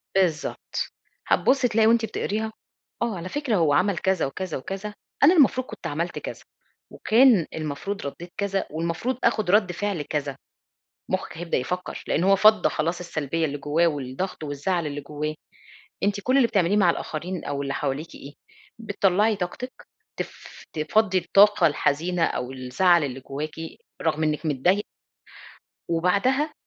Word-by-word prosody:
بالضبط، 170 Hz, -5 st, -1 dB, 0.4 s
هتبُصّي 260 Hz, -1 st, +3 dB
تلاقي 220 Hz, -1 st, +3 dB
وأنتِ 230 Hz, 0 st, +4 dB
بتقريها: 220 Hz, 0 st, -3 dB, 0.5 s
آه 230 Hz, -5 st, -1 dB
على 175 Hz, +2 st, -6 dB
فكرة 285 Hz, -6 st, -1 dB
هو 160 Hz, -6 st, +3 dB
عمل 190 Hz, +4 st, +2 dB
كذا 190 Hz, -3 st, +1 dB
وكذا 185 Hz, +6 st, -4 dB
وكذا، 195 Hz, +8 st, -6 dB, 0.3 s
أنا 315 Hz, -, +8 dB
المفروض 260 Hz, -6 st, +4 dB
كنت -, -, -7 dB
عملت 170 Hz, +4 st, -3 dB
كذا، -, -, -7 dB, 0.5 s
وكان 225 Hz, -7 st, +4 dB
المفروض 160 Hz, +6 st, -4 dB
رديت 170 Hz, +5 st, -7 dB
كذا، 200 Hz, -1 st, -1 dB
والمفروض 170 Hz, +10 st, -2 dB
أخد 215 Hz, -5 st, +2 dB
رد 205 Hz, -3 st, +4 dB
فعل 200 Hz, -3 st, -2 dB
كذا، 145 Hz, -2 st, -3 dB, 0.7 s
مخك -, -, -3 dB
هيبدأ 170 Hz, 0 st, -1 dB
يفكر 180 Hz, +8 st, -4 dB
لأن 170 Hz, -, +1 dB
هو 195 Hz, +1 st, +5 dB
فضّى 215 Hz, +2 st, +5 dB
خلاص 170 Hz, +3 st, -1 dB
السلبية 165 Hz, -2 st, -2 dB
اللي 145 Hz, -1 st, -3 dB
جواه 155 Hz, +4 st, +2 dB
والضغط 145 Hz, +4 st, -4 dB
والزعل 150 Hz, +3 st, -1 dB
اللي 145 Hz, 0 st, -4 dB
جواه، 150 Hz, +2 st, -4 dB, 0.7 s
أنتِ 200 Hz, 0 st, +1 dB
كل 255 Hz, +6 st, +1 dB
اللي 250 Hz, -4 st, +5 dB
بتعمليه 195 Hz, +1 st, +2 dB
مع 180 Hz, -4 st, +5 dB
الآخرين 170 Hz, +3 st, -4 dB
أو 140 Hz, 0 st, -3 dB
اللي 140 Hz, 0 st, -3 dB
حواليكِ 145 Hz, +3 st, -3 dB
إيه؟ 140 Hz, +1 st, -10 dB, 0.5 s
بتطلعي 205 Hz, -1 st, +2 dB
طاقتِك، 195 Hz, +7 st, -6 dB, 0.3 s
تف -, -, -8 dB
تفضّي 185 Hz, +5 st, +2 dB
الطاقة 195 Hz, 0 st, +5 dB
الحزينة 165 Hz, +4 st, +1 dB
أو 125 Hz, +1 st, -2 dB
الزعل 145 Hz, +6 st, +3 dB
اللي 135 Hz, -1 st, -5 dB
جواكِ 150 Hz, +4 st, -5 dB, 0.5 s
رغم 160 Hz, -1 st, 0 dB
إنِك 155 Hz, +1 st, -1 dB
متضايق 175 Hz, +9 st, +2 dB, 1.0 s
وبعدها 200 Hz, -, +1 dB
175 Hz, 145 wpm, -25 LUFS, 150-205 Hz, 1.0 s, أنا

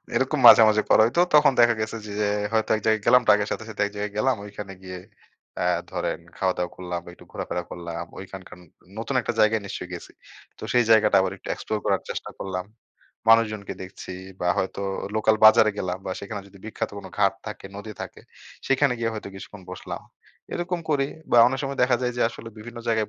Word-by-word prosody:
এরকম -, -, +1 dB
মাঝে, 115 Hz, -, +11 dB
মাঝে, 110 Hz, 0 st, +3 dB
করা -, -, +7 dB
হইত। 120 Hz, -, -3 dB, 0.2 s
তখন 150 Hz, -2 st, +7 dB
দেখা 120 Hz, 0 st, +6 dB
গেছে 110 Hz, +1 st, -3 dB
যে, 105 Hz, -, -7 dB
যে, 105 Hz, -, +2 dB, 0.3 s
হয়তো 110 Hz, -1 st, +1 dB
এক -, -, -5 dB
জায়গায় 110 Hz, -1 st, +2 dB
গেলাম 125 Hz, 0 st, +6 dB
ট্রাকের 105 Hz, 0 st, +4 dB
সাথে, 110 Hz, -, -4 dB
সাথে, 105 Hz, -1 st, -3 dB
এক 100 Hz, -, -6 dB
জায়গায় 105 Hz, 0 st, -3 dB
গেলাম। 130 Hz, +5 st, +2 dB
ঐখানে 100 Hz, -1 st, -8 dB
গিয়ে 90 Hz, -1 st, -7 dB, 0.6 s
আ -, -, +1 dB, 0.3 s
ধরেন -, -, -2 dB, 0.2 s
খাওয়া-দাওয়া 90 Hz, -2 st, -1 dB
করলাম 90 Hz, -1 st, -5 dB
একটু -, -, -16 dB
ঘোরাফেরা 90 Hz, -, -3 dB
করলাম। 85 Hz, 0 st, -6 dB
ঐখানকার 95 Hz, -1 st, -10 dB
ন -, -, -16 dB, 0.4 s
নতুন 115 Hz, +4 st, -3 dB
একটা 120 Hz, -, -2 dB
জায়গায় 110 Hz, 0 st, +3 dB
নিশ্চয়ই 90 Hz, -2 st, -6 dB
গেছি। 85 Hz, -, -10 dB, 0.5 s
তো -, -, -15 dB
সেই 120 Hz, -1 st, +4 dB
জায়গাটা 105 Hz, -2 st, +5 dB
আবার 95 Hz, 0 st, 0 dB
একটু -, -, -12 dB
এক্সপ্লোর 110 Hz, -, -3 dB
করার -, -, +1 dB
চেষ্টা -, -, -5 dB
করলাম, 90 Hz, -1 st, -4 dB, 0.6 s
মানুষজনকে 110 Hz, -3 st, +3 dB
দেখছি, 95 Hz, 0 st, -9 dB, 0.3 s
বা 90 Hz, -, -1 dB
হয়তো 95 Hz, +1 st, -2 dB, 0.4 s
লোকাল 110 Hz, 0 st, +3 dB
বাজারে 110 Hz, 0 st, +8 dB
গেলাম, 90 Hz, 0 st, -2 dB
বা 95 Hz, -, -2 dB
সেখানে 100 Hz, 0 st, -6 dB
যদি 100 Hz, -, -17 dB
বিখ্যাত 110 Hz, -, -4 dB
কোন -, -, -9 dB
ঘাট 100 Hz, -1 st, +4 dB
থাকে, 105 Hz, -2 st, -7 dB
নদী 105 Hz, +1 st, -7 dB
থাকে -, -, -9 dB, 0.5 s
সেখানে 135 Hz, 0 st, +3 dB
গিয়ে 115 Hz, -1 st, 0 dB
হয়তো 110 Hz, -, -6 dB
কিছুক্ষণ 95 Hz, 0 st, -10 dB
বসলাম। 90 Hz, -, -7 dB, 0.5 s
এরকম 175 Hz, 0 st, -2 dB
করি 140 Hz, -2 st, +2 dB, 0.2 s
বা -, -, +4 dB
অনেক 130 Hz, +2 st, 0 dB
সময় 135 Hz, 0 st, -4 dB
দেখা 125 Hz, 0 st, +4 dB
যায় 125 Hz, 0 st, 0 dB
যে -, -, +1 dB
আসলে 115 Hz, 0 st, -10 dB
বিভিন্ন 120 Hz, +2 st, -9 dB
জায়গায় 110 Hz, -2 st, +1 dB
105 Hz, 200 wpm, -24 LUFS, 95-115 Hz, 0.6 s, মাঝে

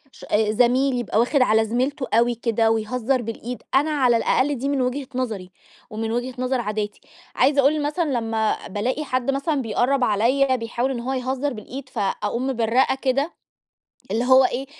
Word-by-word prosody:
ش -, -, -15 dB
آآ 210 Hz, 0 st, +2 dB
زميل 250 Hz, +4 st, +2 dB
يبقى 220 Hz, -2 st, -1 dB
واخِد 255 Hz, +4 st, +2 dB
على 220 Hz, -2 st, +4 dB
زميلته 260 Hz, +5 st, -1 dB
أوي 235 Hz, +2 st, +3 dB
كده 225 Hz, -1 st, +1 dB
ويهزّر 245 Hz, +3 st, 0 dB
بالإيد. 230 Hz, +2 st, -6 dB
أنا 290 Hz, +3 st, +3 dB
على 255 Hz, -5 st, +3 dB
الأقل 280 Hz, +5 st, +1 dB
دي 270 Hz, +3 st, -2 dB
من 280 Hz, -2 st, 0 dB
وجهة 255 Hz, +2 st, -2 dB
نظَري 215 Hz, -8 st, -3 dB, 0.4 s
ومن 220 Hz, +1 st, -3 dB
وجهة 245 Hz, +2 st, -2 dB
نظَر 255 Hz, 0 st, 0 dB
عاداتي. 210 Hz, -1 st, -4 dB, 0.3 s
عايزة 280 Hz, 0 st, +4 dB
أقول 295 Hz, +2 st, +2 dB
مثلًا 300 Hz, +2 st, -1 dB
لمّا 225 Hz, -1 st, -1 dB
بالاقي 245 Hz, +9 st, -2 dB
حَد 255 Hz, -1 st, -1 dB
مثلًا 280 Hz, +1 st, -1 dB
بيقرّب 255 Hz, +3 st, +1 dB
عليَّ 255 Hz, +6 st, +2 dB
بيحاول 240 Hz, +3 st, -2 dB
إن 245 Hz, -, -3 dB
هو 255 Hz, +3 st, -3 dB
يهزّر 260 Hz, +2 st, -2 dB
بالإيد 255 Hz, +4 st, -8 dB
فأقوم 210 Hz, +4 st, -2 dB
مبرّقة 245 Hz, +1 st, +2 dB
كده، 275 Hz, +4 st, 0 dB, 0.8 s
اللي 230 Hz, +4 st, 0 dB
هو 260 Hz, +1 st, +6 dB
إيه، 255 Hz, +2 st, -2 dB
250 Hz, 170 wpm, -22 LUFS, 225-270 Hz, 0.8 s, هو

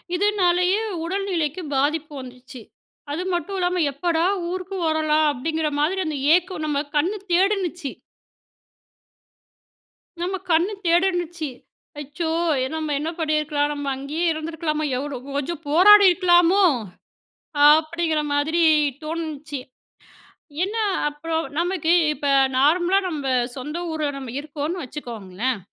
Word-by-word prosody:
இதனாலேயே 370 Hz, 0 st, +2 dB, 0.2 s
உடல்நிலைக்கு 365 Hz, -3 st, -2 dB
பாதிப்பு 300 Hz, +2 st, 0 dB
வந்துச்சு. 255 Hz, 0 st, -11 dB, 0.5 s
அது 330 Hz, +5 st, -2 dB
மட்டும் 350 Hz, +3 st, -2 dB
இல்லாம 360 Hz, 0 st, 0 dB
"எப்போடா 330 Hz, +3 st, 0 dB, 0.3 s
ஊருக்கு 370 Hz, +1 st, -5 dB
வரலாம்!" 310 Hz, 0 st, +2 dB
அப்டிங்கற 315 Hz, +4 st, -2 dB
மாதிரி 345 Hz, +6 st, +1 dB
அந்த 305 Hz, -2 st, -3 dB, 0.2 s
ஏக்கம் 360 Hz, -3 st, -2 dB
நம்ம 295 Hz, -2 st, 0 dB, 0.2 s
கண்ணு 355 Hz, +8 st, +1 dB, 0.2 s
தேடினுச்சு. 360 Hz, -5 st, +1 dB, 2.3 s
நம்ம 370 Hz, +2 st, -1 dB
கண்ணு 340 Hz, +5 st, +3 dB
தேடுன்னுச்சு. 345 Hz, -2 st, +1 dB, 0.5 s
"அச்சோ! 295 Hz, +3 st, -4 dB, 0.5 s
நம்ம 315 Hz, -1 st, -3 dB
என்ன 315 Hz, +3 st, -3 dB
பண்ணியிருக்கலாம் 300 Hz, -2 st, 0 dB
நம்ம 285 Hz, -1 st, -5 dB
அங்கேயே 295 Hz, +6 st, -3 dB
இருந்துருக்கலாமா, 315 Hz, -1 st, -3 dB
எவ்ளோ 285 Hz, -1 st, -4 dB, 0.2 s
கொஞ்சம் 320 Hz, +3 st, -4 dB
போராடியிருக்கலாமோ?" 365 Hz, +1 st, +6 dB, 1.0 s
அப்டிங்கற 315 Hz, +1 st, +2 dB
மாதிரி 315 Hz, +4 st, +1 dB, 0.4 s
தோணுச்சு. 310 Hz, -3 st, -5 dB, 1.0 s
என்ன 410 Hz, +4 st, -2 dB, 0.3 s
அப்பறம் 320 Hz, +2 st, -3 dB
நமக்கு 345 Hz, -1 st, +1 dB, 0.2 s
இப்ப 290 Hz, -, -5 dB, 0.3 s
நார்மலா 345 Hz, +7 st, +3 dB
நம்ம 295 Hz, -5 st, -4 dB, 0.3 s
சொந்த 300 Hz, +6 st, -5 dB
ஊர்ல 310 Hz, -2 st, -1 dB
நம்ம 265 Hz, -4 st, -7 dB
இருக்கோம்னு 305 Hz, +4 st, -4 dB
வச்சுக்கோங்களேன், 235 Hz, -3 st, -4 dB
320 Hz, 105 wpm, -23 LUFS, 295-355 Hz, 2.3 s, போராடியிருக்கலாமோ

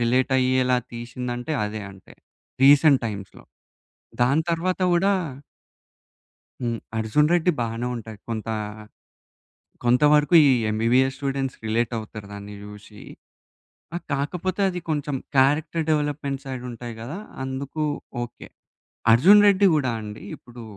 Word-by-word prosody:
రిలేటయ్యేలా 130 Hz, +1 st, +2 dB, 0.2 s
తీశిందంటే, 120 Hz, +3 st, -5 dB
అదే 105 Hz, 0 st, -5 dB
అంటే, 95 Hz, -, -17 dB, 0.5 s
రీసెంట్ 140 Hz, 0 st, +6 dB
టైమ్స్‌లో. 100 Hz, -3 st, -8 dB, 0.8 s
దాని 140 Hz, +6 st, +3 dB
తర్వాత 180 Hz, +3 st, -1 dB
గూడా 195 Hz, +4 st, +3 dB, 1.5 s
హ్మ్. 120 Hz, -2 st, -2 dB, 0.2 s
'అర్జున్ 130 Hz, +8 st, +2 dB
రెడ్డి' 175 Hz, 0 st, +3 dB
బానే 115 Hz, +1 st, -2 dB
ఉంటాయి. 110 Hz, -2 st, -9 dB
కొంత 115 Hz, -1 st, -4 dB, 1.4 s
కొంత 125 Hz, +3 st, +3 dB
వరకు 150 Hz, +4 st, +3 dB
ఈ -, -, +6 dB, 0.2 s
ఎంబీబీఎస్ 120 Hz, +5 st, +2 dB
స్టూడెంట్స్ 135 Hz, -2 st, -2 dB
రిలేటవుతారు 110 Hz, -2 st, -2 dB
దాన్ని 100 Hz, 0 st, -8 dB
జూశి. 105 Hz, 0 st, -12 dB, 0.9 s
ఆహ్, 175 Hz, -, -5 dB
కాకపోతే 180 Hz, +7 st, -2 dB
అది 180 Hz, -1 st, -4 dB
కొంచెం 145 Hz, -2 st, -1 dB, 0.2 s
క్యారెక్టర్ 150 Hz, +5 st, +2 dB
డెవలప్మెంట్ 145 Hz, -2 st, -1 dB
సైడ్ 130 Hz, -2 st, -6 dB
ఉంటాయి 120 Hz, 0 st, -7 dB
గదా! 135 Hz, +11 st, -6 dB, 0.3 s
అందుకు 135 Hz, +3 st, -4 dB, 0.4 s
ఓకే. 120 Hz, -, -10 dB, 0.6 s
'అర్జున్ 190 Hz, -, +7 dB
రెడ్డి' 200 Hz, 0 st, +5 dB
గూడా 135 Hz, -5 st, +1 dB
అండి 105 Hz, 0 st, -8 dB
ఇప్పుడు 120 Hz, -1 st, -13 dB
130 Hz, 115 wpm, -24 LUFS, 115-150 Hz, 1.5 s, అర్జున్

